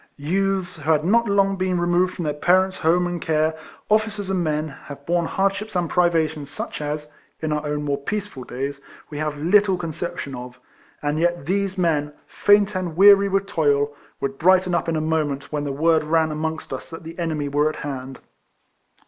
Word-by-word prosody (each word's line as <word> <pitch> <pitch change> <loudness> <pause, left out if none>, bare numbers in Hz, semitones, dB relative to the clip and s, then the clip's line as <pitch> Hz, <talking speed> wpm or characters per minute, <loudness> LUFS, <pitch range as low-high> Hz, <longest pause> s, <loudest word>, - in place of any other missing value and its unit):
Youths, 185 +4 -1
who 155 0 -5
had 155 0 +2
not 235 +5 +3
long 195 -1 +2
been 185 -1 0
removed 175 +1 +1
from 175 - -4
their 150 - 0
parents' 185 +5 +2
home 175 +3 +3
and 175 -1 -3
care, 155 0 +1 0.3
officers 215 -2 0
and 185 -2 0
men, 155 -1 -1
have 140 0 -11
borne 170 -1 +1
hardships 195 +3 -1
and 175 -1 +1
privations 160 -4 +1
such - - -6
as 150 0 -4 0.3
(in 155 -1 -2
our 150 0 -1
own 150 0 -2
more 140 -1 -1
peaceful 200 -3 -4
days) 140 +3 -5 0.3
we 145 - -5
have 150 -1 -2
little 190 +5 +3
con 165 -2 -4
ception 170 -4 -5
of; 125 0 -9 0.4
and 145 +1 0
yet 175 -3 0
these 195 +1 -1
men, 150 -5 +1
faint 205 0 +3
and 180 -4 -3
weary 200 +1 +7
with 195 0 +1
toil, 145 -5 +1 0.2
would 135 0 -3
brighten 185 +1 +4
up 170 - 0
in 165 - 0
a - - +1
62 155 - -2
RECOLLECTIONS - - +3
OF 150 - -1
moment 140 -1 -6
when 150 -1 -2
the 140 0 -4
word 165 -1 +4
ran 160 0 +2
amongst 160 -1 -4
us 130 - -6
that 165 - -9
the 165 +2 -9
enemy 155 -4 -1
were 145 +2 +2
at 155 - -6
hand. 135 -2 -6
165 Hz, 205 wpm, -22 LUFS, 150-185 Hz, 0.4 s, weary